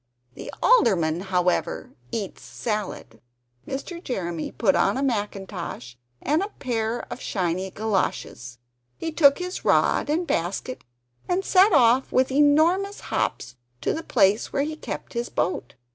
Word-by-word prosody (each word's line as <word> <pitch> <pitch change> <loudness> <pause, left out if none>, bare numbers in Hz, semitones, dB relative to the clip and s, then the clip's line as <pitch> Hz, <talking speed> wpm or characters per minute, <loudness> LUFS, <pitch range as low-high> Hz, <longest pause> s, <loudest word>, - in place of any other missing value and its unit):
The - - -8
Alderman, 175 - +4
however, 180 -1 0 0.2
eats 205 -4 -4
salad." 210 - -5 0.5
Mr. 335 +6 -6
Jeremy 175 -9 -3
put 195 -5 +2
on 200 +5 +2
a 270 - -1
mackintosh, 205 - -4 0.3
and 305 +5 +2
a 400 - -1
pair 230 -2 -2
of - - -10
shiny 185 0 -2
galoshes; 190 - -2 0.4
he 325 - -4
took 285 -3 +5
his 360 0 -5
rod - - +2
and 330 +4 +1
basket, 200 - -2 0.5
and 370 +2 0
set 385 +3 +5
off 245 +2 +4
with 260 +1 +2
enormous 315 +8 +3
hops - - -1 0.3
to - - 0
the 320 - -3
place 205 -7 +2
where 280 - 0
he 310 +1 -3
kept - - -7
his 235 0 -3
boat. 175 -8 -2
235 Hz, 140 wpm, -24 LUFS, 190-300 Hz, 0.5 s, took